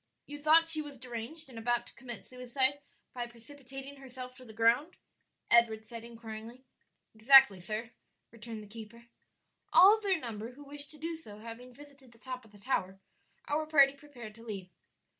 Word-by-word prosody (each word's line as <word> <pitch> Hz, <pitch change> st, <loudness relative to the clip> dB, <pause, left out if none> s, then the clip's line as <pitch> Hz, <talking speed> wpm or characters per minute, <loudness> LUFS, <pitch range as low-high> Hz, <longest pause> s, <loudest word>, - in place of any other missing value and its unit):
"You 290 Hz, 0 st, -8 dB
thought 320 Hz, +2 st, +6 dB
she 320 Hz, -1 st, +2 dB
was 290 Hz, -2 st, -9 dB
deranged 250 Hz, +6 st, -6 dB
and 240 Hz, -4 st, -9 dB
about 240 Hz, +1 st, 0 dB
to -, -, -12 dB
commit 240 Hz, -3 st, -6 dB
suicide 260 Hz, +3 st, 0 dB, 0.3 s
by 245 Hz, -1 st, -3 dB
precipitating 270 Hz, +3 st, -11 dB
herself 255 Hz, -1 st, -9 dB
to 255 Hz, -, -13 dB
the 230 Hz, -, -11 dB
ground?" 230 Hz, -, +2 dB, 0.6 s
Edward 225 Hz, -2 st, +5 dB
said 230 Hz, +1 st, -8 dB
inquiringly. 230 Hz, +2 st, -9 dB, 0.5 s
"Exactly, 230 Hz, -2 st, +7 dB
sir," 215 Hz, +5 st, -4 dB, 0.4 s
returned 225 Hz, -1 st, -8 dB
the -, -, -13 dB
keeper. 225 Hz, +2 st, -11 dB, 0.7 s
All 395 Hz, +4 st, +9 dB
of 440 Hz, -, -8 dB
their 390 Hz, -3 st, +2 dB
number 230 Hz, -2 st, -6 dB
who 290 Hz, +3 st, -13 dB
wished 285 Hz, 0 st, -4 dB
to 305 Hz, -, -13 dB
do 330 Hz, +2 st, -4 dB
so 215 Hz, -11 st, -11 dB
having 230 Hz, +3 st, -10 dB
visited 275 Hz, -2 st, -16 dB
the -, -, -20 dB
top 255 Hz, +1 st, -7 dB
of 220 Hz, -, -19 dB
the 205 Hz, -, -16 dB
tower, 195 Hz, -4 st, -2 dB, 0.5 s
our 305 Hz, +1 st, 0 dB
party 280 Hz, -3 st, +6 dB
prepared 275 Hz, -7 st, -11 dB
to 230 Hz, +1 st, -14 dB
leave. 195 Hz, -5 st, -7 dB
250 Hz, 180 wpm, -32 LUFS, 225-280 Hz, 0.7 s, All